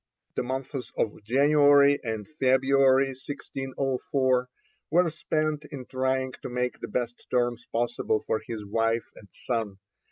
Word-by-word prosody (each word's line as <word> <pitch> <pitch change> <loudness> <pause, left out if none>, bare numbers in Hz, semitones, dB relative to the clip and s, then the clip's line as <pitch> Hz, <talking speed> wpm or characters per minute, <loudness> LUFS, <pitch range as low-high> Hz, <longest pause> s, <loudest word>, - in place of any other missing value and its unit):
The - - -1
months 130 0 -4
of 105 -1 -1
January 145 +3 +5
and 110 -3 -4
February 135 -1 +3
1604 130 -1 -1 0.4
were 175 +2 +4
spent 155 -1 -1
in 135 -3 -8
trying 130 0 -1
to - - -5
make 125 0 -2
the - - -5
best 120 +1 -4
terms 120 -1 0
possible 120 -2 0
for 110 - 0
his 110 -3 -6
wife 115 +2 0
and 100 - -14
son. 110 -5 -3
130 Hz, 130 wpm, -27 LUFS, 120-140 Hz, 0.4 s, January